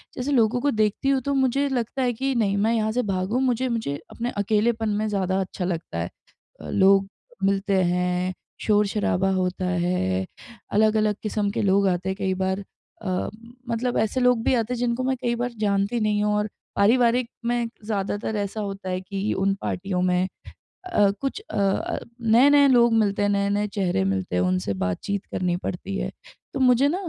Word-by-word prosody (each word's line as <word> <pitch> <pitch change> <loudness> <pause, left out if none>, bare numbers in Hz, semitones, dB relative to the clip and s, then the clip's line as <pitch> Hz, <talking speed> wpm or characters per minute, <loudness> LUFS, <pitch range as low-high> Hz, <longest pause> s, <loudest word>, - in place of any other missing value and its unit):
जैसे 255 +3 -2
लोगों 240 -2 +3
को 285 - +2
देखती 215 +4 +1
हूँ 270 -1 +2
तो 280 - 0
मुझे 270 +1 +2
लगता 250 0 -2
है 250 -1 +1
कि 270 +4 -1
नहीं 200 -4 +1
मैं 220 +3 +2
यहाँ 220 -1 +1
से 245 +3 +1
भागू, 195 +4 -1
मुझे 260 -1 +1
मुझे 225 -12 -2 0.2
अपने 240 +1 -3
अकेलेपन 220 +2 +1
में 210 +1 0
ज़्यादा 190 -2 0
अच्छा 185 -1 -4
लगता 170 - -4
है। 85 +1 -2 0.5
अ, - - -8
लोग 195 0 +4 0.4
मिलते 195 -1 +2
हैं, 180 +1 0 0.3
शोर-शराबा 205 -2 +1
होता 185 0 -1
है। 175 - 0 0.5
अलग-अलग 215 0 +3
किस्म 210 -1 -1
के - - -2
लोग 195 0 +3
आते 180 +1 -1
हैं 190 - -1
कई 190 -1 0
बार 190 +1 -1 0.4
अ, 185 -2 -1 0.4
मतलब 240 +2 -1
ऐसे 220 +4 0
लोग 250 -2 +3
भी - - +2
आते 230 +1 0
हैं - - -3
जिनको 245 +1 0
मैं 260 +1 +1
कई 240 0 0
बार 245 +1 -2
जानती 200 +2 +1
नहीं 210 -1 +1
हूँ 210 0 +1
और 210 +1 0 0.3
पारिवारिक 235 +3 +3 0.2
में 240 0 0 0.2
ज़्यादातर 205 0 -2
ऐसा 205 +1 -3
होता 195 -2 -5
है 185 0 -2
कि 195 +2 -3
उन 195 +1 +1
पार्टियों 185 0 -2
में 180 0 +2 0.6
अ, 210 - +3
कुछ 275 +9 -3
अ - - -3
अ, 195 -1 0 0.2
नए-नए 275 +6 +6
लोग 240 -2 +5
मिलते 205 -3 +2
हैं 205 - +2
नए-नए 200 +1 +1
चेहरे 190 - 0
मिलते 95 -2 -1
हैं 90 - +2
उनसे 90 +2 0
बातचीत 195 - -3
करनी 180 -1 0
पड़ती 190 +2 -4
है। - - -3 0.4
तो - - -3
मुझे 255 +1 +5
न 335 - 0
210 Hz, 185 wpm, -24 LUFS, 190-235 Hz, 0.6 s, नए-नए